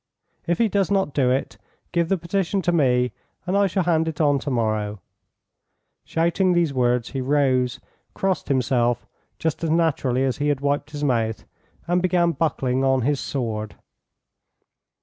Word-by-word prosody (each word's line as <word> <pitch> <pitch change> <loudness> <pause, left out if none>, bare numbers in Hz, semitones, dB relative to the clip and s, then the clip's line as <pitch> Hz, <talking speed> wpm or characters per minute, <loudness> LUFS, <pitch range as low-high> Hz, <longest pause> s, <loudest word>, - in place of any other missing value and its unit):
If 175 - +1
he 230 - +3
does 200 -3 0
not 195 -8 +1
do 130 -3 +2
it, 130 +2 -1 0.3
give 170 -1 0
the 195 - +2
petition 190 +2 -1
to 175 - +2
me, 125 -6 +2 0.3
and 185 - -1
I 200 0 +4
shall 190 0 0
hand 160 -2 +1
it 160 -2 -4
on 145 -3 +3
to 140 - -4
morrow." 110 -4 -1 1.1
Shouting 170 +3 +1
these 170 -4 +1
words, 125 -2 +1
he 135 - -3
rose, 130 -2 +1 0.4
crossed 190 -3 -1
himself 120 -3 +1 0.3
just 160 +1 -2
as 165 - 0
naturally 150 -6 +1
as 130 -2 0
he 145 - -1
had 145 -2 +1
wiped 145 +1 -1
his 145 -1 -6
mouth, 115 -5 0 0.4
and 175 +1 +2
began 175 -2 +2
buckling 135 -6 0
on 135 -1 +3
his 140 +3 0
sword. 110 -5 -3
145 Hz, 165 wpm, -23 LUFS, 125-170 Hz, 1.1 s, I